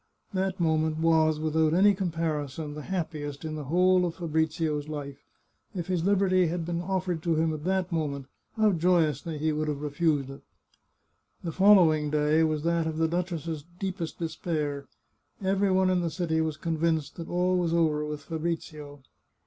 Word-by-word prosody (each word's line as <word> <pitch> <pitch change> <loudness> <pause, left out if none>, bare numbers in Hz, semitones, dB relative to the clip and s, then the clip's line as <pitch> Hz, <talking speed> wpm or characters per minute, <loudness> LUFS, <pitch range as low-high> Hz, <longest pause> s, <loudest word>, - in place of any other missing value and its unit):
That 190 0 -1
moment 160 -2 +1
was, 160 -1 +3
without 155 0 +1
any 200 +3 +6
comparison, 160 -5 -3
the 150 - -6
happiest 155 -4 -4
in 155 - -4
the 150 -2 -5
whole 180 +4 +3
of 170 -2 -2
Fabrizio's 160 -2 -1
life. 145 -3 -6 0.6
If 175 -3 -3
his 180 -2 -1
liberty 185 -2 +3
had 170 0 -2
been 170 0 -2
offered 185 -2 -2
to 165 0 +1
him 160 0 +1
at 155 0 -6
that 190 0 0
moment, 145 -4 -2 0.3
how 215 -1 +4
joyously 165 -3 +1 0.2
would 155 +1 -1
he - - 0
have 145 - -5
refused 145 -2 0
it! 135 - -11 1.0
The 170 - -3
following 170 -5 +5
day 150 +1 +2
was 155 -1 0
that 170 -1 +1
of 160 -1 -3
the 160 0 +2
duchess's 165 -3 -3
deepest 185 -3 -4
de 170 - -2
spair. 150 -3 -3 0.5
Every 195 +1 +1
one 185 0 +3
in 180 -1 +2
the 170 - -1
city 160 -1 -1
was 160 -2 -2
convinced 160 -3 -1
that 170 - -7
all 180 +1 +1
was 170 -2 0
over 160 -3 +2
with 150 -1 -5
Fabrizio. 155 -3 -5
160 Hz, 175 wpm, -27 LUFS, 155-180 Hz, 1.0 s, any